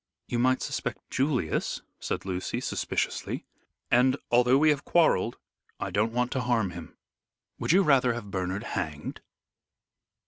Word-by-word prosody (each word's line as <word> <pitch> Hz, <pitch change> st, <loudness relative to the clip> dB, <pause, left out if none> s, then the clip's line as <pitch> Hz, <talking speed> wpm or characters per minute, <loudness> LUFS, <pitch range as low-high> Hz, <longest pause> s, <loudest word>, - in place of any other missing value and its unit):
"You 120 Hz, -, -2 dB
might 130 Hz, +1 st, +2 dB
suspect -, -, -4 dB
Julius," 130 Hz, -, 0 dB, 0.2 s
said -, -, -3 dB
Lucy, 95 Hz, -1 st, -2 dB
suspiciously, -, -, -2 dB, 0.5 s
"and 125 Hz, +2 st, +4 dB
although 125 Hz, +2 st, +5 dB
we 155 Hz, +2 st, +5 dB
have 145 Hz, -1 st, -1 dB
quarrelled 140 Hz, -, +3 dB, 0.4 s
I -, -, -3 dB
don't 110 Hz, +2 st, +1 dB
want 125 Hz, +1 st, 0 dB
to 130 Hz, -, 0 dB
harm 115 Hz, -6 st, +1 dB
him." 85 Hz, -2 st, -10 dB, 0.6 s
"Would -, -, +1 dB
you 190 Hz, +3 st, +6 dB
rather 130 Hz, -6 st, +4 dB
have 110 Hz, -4 st, -7 dB
Bernard 95 Hz, +2 st, -2 dB
hanged?" 75 Hz, -9 st, -4 dB
120 Hz, 140 wpm, -28 LUFS, 95-130 Hz, 0.6 s, you